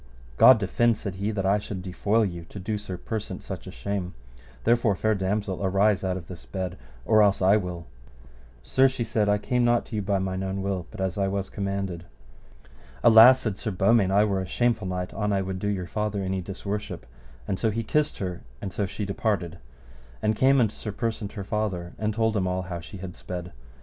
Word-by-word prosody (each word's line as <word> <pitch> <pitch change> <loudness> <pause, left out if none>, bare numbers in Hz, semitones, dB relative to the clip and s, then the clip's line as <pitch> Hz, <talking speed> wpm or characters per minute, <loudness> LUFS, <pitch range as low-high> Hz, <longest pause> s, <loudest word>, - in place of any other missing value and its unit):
God 130 - +9
defend, 110 +2 +2
said 100 -4 -5
he, 100 +2 -1
that 100 -3 -2
I 100 +2 +3
should 100 -3 -6
defoil 105 +4 +1
you 85 -3 -5
to 90 - -11
do 105 +2 -3
Sir 95 -3 -6
Persant 110 +3 -5
such - - -7
a - - -6
shame; 90 +7 -4 0.5
therefore, 115 -3 +3
fair 110 +3 +1
damosel, 100 0 -2
arise 100 +1 +2
out 95 -1 -1
of 85 - -8
this 90 -3 -9
bed 95 -2 -4 0.3
or 110 +8 +5
else 100 -1 +4
I 95 +2 +5
will. 90 -4 -5 0.8
Sir, 130 - +4
she 130 -2 -2
said, 110 -2 0
I 105 - +4
came 125 +3 0
not 120 0 +3
to 115 - -7
you 105 - 0
by 100 0 0
mine 95 0 -2
own 95 0 -3
will, 95 -3 -2
but - - -8
as 95 0 -1
I 100 - +2
was 95 0 -2
commanded. 100 -3 -3 1.0
Alas, 120 +3 +9
said 105 -4 -3
Sir - - -3
Beaumains, 100 +1 +3
I 100 +2 +4
were 100 -3 0
a 95 - -5
shameful 115 -1 0
knight 90 0 -3
an 105 -1 -1
I 95 -1 +1
would 95 0 -4
do 105 - -2
your 95 -3 -1
father 105 +1 -2
any 95 0 -1
disworship; 100 -3 -5 0.4
and 95 - -2
so 110 - +2
he 115 +2 -2
kissed 150 +7 0
her, 90 -3 -4 0.2
and 95 - -6
so 100 - -1
she 100 +2 -4
departed 100 -4 -2 0.6
and 110 - +1
came 135 +4 +4
unto 110 -3 +2
Sir 105 - -6
Persant 110 -2 -3
her 100 -4 -5
father, 95 -4 -2
and 110 0 0
told 110 0 +1
him 95 -3 +1
all 90 0 -1
how 90 -1 -5
she 85 +4 -10
had 90 -1 -7
sped. 90 -1 -6
100 Hz, 215 wpm, -26 LUFS, 95-110 Hz, 1.0 s, God